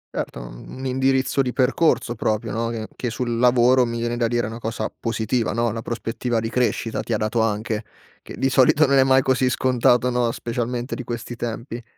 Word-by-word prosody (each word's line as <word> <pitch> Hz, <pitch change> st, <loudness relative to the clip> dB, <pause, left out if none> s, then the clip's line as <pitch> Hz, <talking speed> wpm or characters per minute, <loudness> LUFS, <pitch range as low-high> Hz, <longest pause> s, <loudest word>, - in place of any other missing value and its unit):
Erto, 60 Hz, -, -4 dB
un -, -, -9 dB
indirizzo 130 Hz, +1 st, +1 dB
di 125 Hz, -2 st, -2 dB
percorso 130 Hz, -1 st, +2 dB
proprio 110 Hz, -1 st, -1 dB
no, 115 Hz, +2 st, -1 dB
che 110 Hz, -2 st, -4 dB
che 125 Hz, -, -3 dB
sul 120 Hz, 0 st, -2 dB
lavoro, 125 Hz, +1 st, +5 dB
mi 115 Hz, -1 st, -2 dB
viene 120 Hz, 0 st, -2 dB
da 120 Hz, -1 st, +1 dB
dire, 120 Hz, 0 st, 0 dB
una 110 Hz, +2 st, -6 dB
cosa 115 Hz, -1 st, -3 dB
positiva 115 Hz, +1 st, -1 dB
no, 120 Hz, 0 st, +1 dB
una 115 Hz, +1 st, -4 dB
prospettiva 115 Hz, +1 st, -2 dB
di 115 Hz, 0 st, -3 dB
crescita 120 Hz, -2 st, 0 dB
ti 120 Hz, -, -3 dB
ha -, -, +2 dB
dato 110 Hz, +2 st, 0 dB
anche, 110 Hz, 0 st, -1 dB, 0.4 s
che -, -, -10 dB
di 135 Hz, -, +1 dB
solito 140 Hz, +4 st, +5 dB
non 140 Hz, -1 st, +4 dB
è -, -, +7 dB
mai 130 Hz, 0 st, +4 dB
così 130 Hz, -1 st, +2 dB
scontato 125 Hz, -1 st, +2 dB
no, 120 Hz, -1 st, +1 dB
specialmente 120 Hz, +1 st, -3 dB
di 130 Hz, -, -4 dB
questi 120 Hz, 0 st, -5 dB
tempi. 115 Hz, +1 st, -5 dB
120 Hz, 200 wpm, -22 LUFS, 115-125 Hz, 0.4 s, è